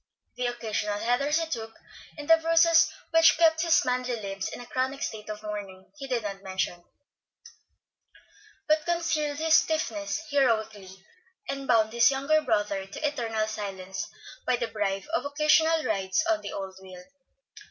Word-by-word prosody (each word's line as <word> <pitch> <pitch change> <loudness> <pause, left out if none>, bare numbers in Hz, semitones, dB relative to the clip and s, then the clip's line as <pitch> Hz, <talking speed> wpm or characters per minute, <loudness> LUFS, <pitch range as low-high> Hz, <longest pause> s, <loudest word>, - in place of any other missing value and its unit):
The 250 - -1
occasional 215 -3 -2
headers 245 +7 +1
he 330 - -1
took, 225 -7 -5 0.4
and 295 -1 -8
the 325 - +7
bruises 330 0 +4 0.2
which 330 0 +6
kept 320 -1 +4
his 335 -1 +3
manly 250 0 -1
limbs 195 -3 -5
in - - -8
a 245 - -9
chronic 260 +3 -2
state 215 -1 -5
of 215 0 -6
mourning 200 -3 -7
he 275 -2 -8
did 245 -4 -1
not 195 -1 -5
mention; 190 -2 -3 1.8
but 310 0 +3
concealed 315 -4 -1
his 320 +1 +1
stiffness 310 -1 +1
heroically, 220 -8 0 0.4
and 275 0 -4
bound 220 -2 +3
his 235 -1 +5
younger 280 +3 +2
brother 205 -6 -1
to 295 +10 -3
eternal 225 -6 -2
silence 195 -3 -5 0.4
by 250 - +3
the 235 -1 -3
bribe 200 -3 -2
of 330 - +1
occasional 305 +2 +3
rides 200 - 0
on 330 -1 +1
the - - -6
old 195 -1 -6
wheel. 185 -1 -11
245 Hz, 155 wpm, -27 LUFS, 205-305 Hz, 1.8 s, the